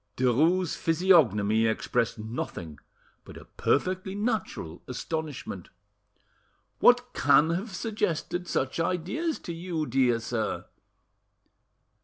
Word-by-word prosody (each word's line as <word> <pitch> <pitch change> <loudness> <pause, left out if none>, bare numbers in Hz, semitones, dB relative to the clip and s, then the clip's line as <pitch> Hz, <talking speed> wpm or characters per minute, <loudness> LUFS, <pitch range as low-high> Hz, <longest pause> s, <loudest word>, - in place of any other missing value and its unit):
Derues' 155 +9 +2
physiognomy 125 - +3
expressed 115 +1 0
nothing 105 -8 -6 0.4
but - - -12
a - - -12
perfectly 185 +5 -1
natural 205 - -3
astonishment. 150 +2 -5 1.1
"What 245 0 +4
can 160 +2 +4
have 190 +4 -3
suggested 180 -4 -2
such 130 0 -1
ideas 185 - -1
to 170 - -6
you; 165 -2 -3
dear 125 -3 +2
sir?" 115 -2 -3
160 Hz, 95 wpm, -27 LUFS, 120-185 Hz, 1.1 s, What